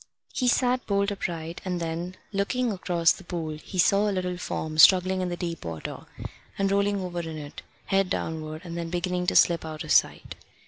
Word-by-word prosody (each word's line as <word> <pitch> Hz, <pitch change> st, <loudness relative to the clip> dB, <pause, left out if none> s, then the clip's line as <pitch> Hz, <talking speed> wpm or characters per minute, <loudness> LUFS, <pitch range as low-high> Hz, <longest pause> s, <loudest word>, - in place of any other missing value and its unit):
He 250 Hz, -, 0 dB
sat 250 Hz, 0 st, +2 dB
bolt 200 Hz, 0 st, +1 dB
upright, 170 Hz, -4 st, -4 dB
and 180 Hz, -2 st, -2 dB
then, 170 Hz, +2 st, -4 dB, 0.2 s
looking 235 Hz, +5 st, 0 dB
across 175 Hz, -4 st, +2 dB
the -, -, -5 dB
pool, 160 Hz, -4 st, -4 dB
he 185 Hz, -, -8 dB
saw 200 Hz, +4 st, +4 dB
a -, -, 0 dB
little 180 Hz, -2 st, -2 dB
form 155 Hz, -3 st, -4 dB
struggling 185 Hz, +2 st, +7 dB
in 180 Hz, -, -1 dB
the 175 Hz, -, -4 dB
deep 170 Hz, -2 st, -4 dB
water, 80 Hz, -2 st, -6 dB, 0.5 s
and 195 Hz, 0 st, +1 dB
rolling 200 Hz, 0 st, +2 dB
over 175 Hz, -1 st, -4 dB
in 160 Hz, -2 st, -5 dB
it, 145 Hz, -1 st, -8 dB, 0.2 s
head 195 Hz, -1 st, +1 dB
downward, 155 Hz, -1 st, -3 dB
and 170 Hz, -1 st, -6 dB
then 170 Hz, -1 st, -4 dB
beginning 180 Hz, +1 st, -1 dB
to -, -, +1 dB
slip 170 Hz, -2 st, +5 dB
out 155 Hz, -1 st, -6 dB
of -, -, -5 dB
sight. -, -, +2 dB
180 Hz, 195 wpm, -26 LUFS, 165-195 Hz, 0.5 s, struggling